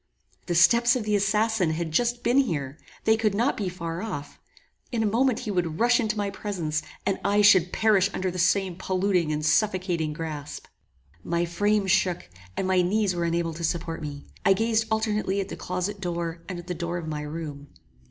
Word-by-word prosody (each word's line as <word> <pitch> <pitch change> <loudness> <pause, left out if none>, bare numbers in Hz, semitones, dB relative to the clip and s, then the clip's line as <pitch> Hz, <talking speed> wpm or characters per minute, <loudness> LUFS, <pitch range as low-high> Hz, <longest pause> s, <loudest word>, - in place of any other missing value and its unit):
The 175 - 0
steps 235 +9 +5
of 250 - -1
the 210 0 +1
assassin 210 -1 +2
had 165 0 -3
just 240 +7 0
been 245 +4 +4
here; 150 - -1 0.2
they 220 - +4
could 215 -2 0
not 240 +7 +1
be 200 -4 -2
far 170 -1 -5
off; 185 -10 -6 0.5
in 230 -3 0
a - - +1
moment 235 +3 +2
he 210 - -3
would 175 -4 -1
rush 240 +1 +4
into 215 -3 -1
my 200 -1 -1
presence, 175 -7 -3 0.2
and 195 - 0
I 205 +1 +3
should 185 -4 +6
perish 205 -3 +3
under 185 -1 -2
the 180 - -5
same 185 0 +2
polluting 185 -3 0
and 150 0 -2
suffocating 180 -2 +1
grasp! 150 -2 -6 0.6
My 170 0 0
frame 205 +4 +1
shook, 180 - +1 0.3
and - - 0
my 185 -1 +3
knees 200 +2 +1
were 170 -1 -1
unable 170 0 -1
to 170 +2 -7
support 165 0 -2
me. 145 -2 -7 0.2
I 195 -2 +5
gazed 225 +2 +1
alternately 215 -3 0
at 195 - -3
the - - -5
closet 185 +3 -4
door 170 -2 -3
and 185 - -4
at 175 - -8
the 180 - -3
door 170 0 -3
of 170 -2 -6
my 150 -1 -3
room. 150 -2 -6
185 Hz, 200 wpm, -26 LUFS, 165-210 Hz, 0.6 s, should